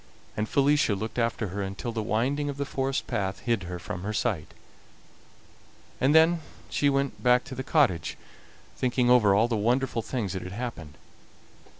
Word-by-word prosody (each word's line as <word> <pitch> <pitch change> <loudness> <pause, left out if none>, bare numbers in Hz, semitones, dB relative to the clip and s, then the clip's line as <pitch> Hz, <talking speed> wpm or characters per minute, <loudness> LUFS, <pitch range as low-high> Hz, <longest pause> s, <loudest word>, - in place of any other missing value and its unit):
And 105 0 -2
Felicia 140 -5 +3
looked 110 +4 -4
after 115 -2 0
her 100 +3 -4
until 100 +4 -4
the 115 -1 -2
winding 130 +7 0
of 140 - -5
the 140 - -2
forest 135 0 -2
path 95 -5 -2
hid 115 -4 0
her 90 - -4
from 90 +3 -6
her 105 +3 -3
sight, 105 -8 -1 1.5
and 140 +4 +3
then 165 +1 +5 0.3
she 145 - +2
went 140 -1 -1
back 125 0 +4
to 145 - -9
the 130 - -4
cottage, 115 - +1 0.6
thinking 125 -1 +1
over 105 -6 +5
all 110 +3 +4
the 120 - -1
wonderful 120 +3 +1
things 110 -5 -3
that 95 - -4
had 90 - -7
happened. 100 -10 -6
120 Hz, 175 wpm, -27 LUFS, 100-135 Hz, 1.5 s, then